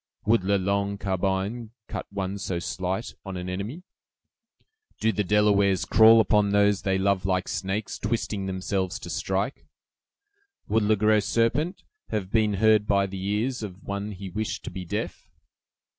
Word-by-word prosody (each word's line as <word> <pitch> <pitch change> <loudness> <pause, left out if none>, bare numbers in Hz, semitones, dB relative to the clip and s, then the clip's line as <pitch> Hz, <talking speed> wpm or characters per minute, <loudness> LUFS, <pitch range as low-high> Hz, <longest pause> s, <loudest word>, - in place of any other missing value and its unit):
"Would 110 -1 +3
'La 100 +2 +2
Longue 100 +1 0
Carbine' 100 +4 -2
cut - - -5
one 100 0 -3
so 95 -2 -2
slight 95 +4 -3
on 95 -2 -6
an 90 0 -5
enemy?" 100 - -5 1.2
"Do 110 - +2
the 105 0 -1
Delawares 100 -1 +3
crawl 115 0 +7
upon 105 -1 +3
those 100 0 +3
they 95 -2 +1
love 95 -1 +1
like 95 -1 0
snakes, 95 +3 -3
twisting 105 -2 -2
themselves 95 +1 -2
to - - -8
strike?" - - -2 1.0
"Would 110 +2 +2
'Le 105 +1 +3
Gros 105 0 +3
Serpent' 120 - 0 0.3
have 100 -3 -3
been 110 -2 +2
heard 110 0 +4
by 100 -1 +3
the 95 -1 -6
ears 110 +5 -1
of 100 -2 -7
one 100 +1 -4
he 95 +1 -7
wished 110 +3 -3
to - - -6
be 90 0 -6
deaf?" - - -4
100 Hz, 160 wpm, -26 LUFS, 95-110 Hz, 1.2 s, crawl